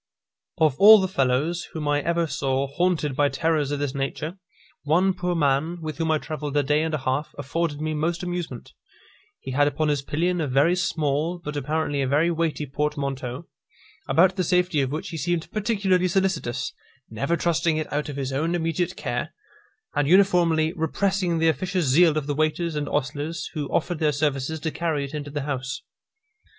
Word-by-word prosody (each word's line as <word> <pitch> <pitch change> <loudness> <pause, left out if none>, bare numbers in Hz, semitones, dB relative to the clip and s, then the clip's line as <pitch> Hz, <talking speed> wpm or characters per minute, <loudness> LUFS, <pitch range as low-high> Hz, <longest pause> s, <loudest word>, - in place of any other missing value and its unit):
Of 155 -5 +3
all 215 +2 +10
the 190 - 0
fellows 150 +2 0
whom 155 -2 -4
I 145 0 +2
ever 170 +1 +1
saw 135 -2 -1
haunted 155 -1 0
by 145 +1 +3
terrors 160 -3 0
of 145 - -1
this 140 -2 -2
nature, 150 +6 -4 0.4
one 175 +6 +2
poor 180 -1 -2
man, 155 +3 +1
with 155 -1 -6
whom 165 -1 0
I 155 - +3
travelled 150 -1 -4
a 145 - +3
day 150 +2 +2
and 160 -1 -1
a - - 0
half, 135 +2 -2
afforded 145 +2 -2
me 155 0 -1
most 165 +4 -1
amusement. 175 -8 -5 0.7
He 130 - -7
had 145 +2 +3
upon 155 +1 0
his 145 -2 +1
pillion 170 +5 -1
a 150 - -1
very 140 +7 +3
small, 165 -2 0
but 150 -4 -7
apparently 145 0 -1
a 135 - 0
very 150 +6 +2
weighty 165 -2 -1
portmanteau, 140 -1 -3 0.6
about 185 +3 +4
the 185 - +1
safety 180 -3 +2
of 135 -1 -1
which 155 - -4
he 165 - -5
seemed 170 +2 -2
particularly 200 -4 +1
solicitous; 180 -9 -1 0.4
never 140 +10 -1
trusting 165 -1 +1
it 155 - -4
out 150 +1 -1
of 145 - -5
his 135 -1 -3
own 160 +5 0
immediate 165 +1 -1
care, - - -4 0.6
and 145 -1 +1
uniformly 170 -3 +4
repressing 180 +2 0
the 165 0 +2
officious 180 +3 0
zeal 155 +4 +4
of 150 - -1
the 145 - -1
waiters 155 +2 0
and 145 -1 -2
ostlers, 145 +3 -3
who 150 -4 -3
offered 175 -3 -1
their 155 -1 +2
services 145 +1 -1
to 160 - -2
carry 155 -4 -1
it 140 - -10
into 145 -1 -5
the 145 0 -3
house. 135 -1 -4
155 Hz, 185 wpm, -24 LUFS, 145-170 Hz, 0.7 s, all